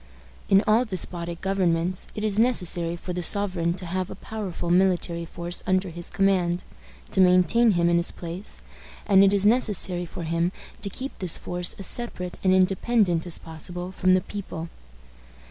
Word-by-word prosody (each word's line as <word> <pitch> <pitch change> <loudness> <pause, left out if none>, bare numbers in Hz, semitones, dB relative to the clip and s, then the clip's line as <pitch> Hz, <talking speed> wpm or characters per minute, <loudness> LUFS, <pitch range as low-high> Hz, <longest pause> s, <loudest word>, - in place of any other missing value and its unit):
In 195 +2 +5
all 220 +3 +4
despotic 175 -5 -5
governments, 180 -2 0
it 210 - -4
is 215 -1 +1
necessary 180 -8 +2
for 180 +1 -6
the 180 - -3
sovereign 175 -2 +1
to 180 0 -6
have 185 +2 -2
a - - -7
powerful 195 -6 -5
military 175 -2 +2
force 170 +1 -5
under 185 0 +1
his 170 +1 -7
command, 185 -3 +1 0.5
to 190 - +3
maintain 185 +5 +5
him 170 -1 +2
in 170 0 +3
his 170 - +2
place; 175 +4 -5 0.4
and 195 -2 +6
it 195 - +5
is 200 0 +2
necessary 205 -6 +2
for 170 - -7
him 170 +2 0 0.3
to 200 - -2
keep 260 +7 -6
this 180 -4 +2
force 175 0 -3
as 195 - -5
separate 180 -7 -3
and 190 - +4
independent 185 -1 +2
as 170 - 0
possible 175 +3 -6
from 185 0 +3
the 185 - +2
people. 180 -5 -6
180 Hz, 170 wpm, -25 LUFS, 170-195 Hz, 0.5 s, and